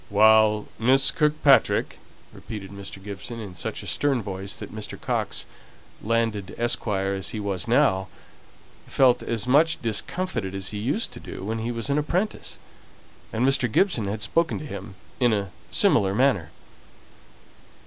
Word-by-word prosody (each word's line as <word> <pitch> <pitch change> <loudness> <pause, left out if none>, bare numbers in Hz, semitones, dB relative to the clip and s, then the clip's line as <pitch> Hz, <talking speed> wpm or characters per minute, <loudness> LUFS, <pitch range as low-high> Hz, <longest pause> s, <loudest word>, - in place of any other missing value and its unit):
"While 110 0 +5
Miss 135 +4 +4
Kirkpatrick 150 -3 +3 0.2
?" - - -27
repeated 105 -3 -8
Mr. 100 -1 -8
Gibson, 105 +4 -7
in 100 -4 -7
such 90 - -5
a - - -9
stern 135 -5 0
voice, 95 0 -5
that 105 -3 -9
Mr. 110 -1 -7
Coxe, - - -2 0.6
landed 110 -3 -1
esquire 100 -4 0
as 95 -1 -3
he 110 - -5
was 100 -4 -3
now, 95 0 +3 0.8
felt 125 -2 +4
as 115 -1 -2
much 155 +5 +3
discomfited 115 - -3
as 95 0 -3
he 105 - -5
used 140 - -1
to - - -9
do - - -8
when 110 +3 -2
he 115 +2 -2
was 115 0 -4
an 145 - +2
apprentice, 180 +8 -2 0.7
and 115 +3 0
Mr. 130 -3 +2
Gibson 125 - +2
had 105 +2 -3
spoken 165 +7 +1
to 150 - -7
him 100 -6 -8 0.2
in 120 -3 +4
a 100 -3 -2 0.2
similar 95 0 +3
manner. 120 - +2
110 Hz, 155 wpm, -25 LUFS, 100-130 Hz, 0.8 s, While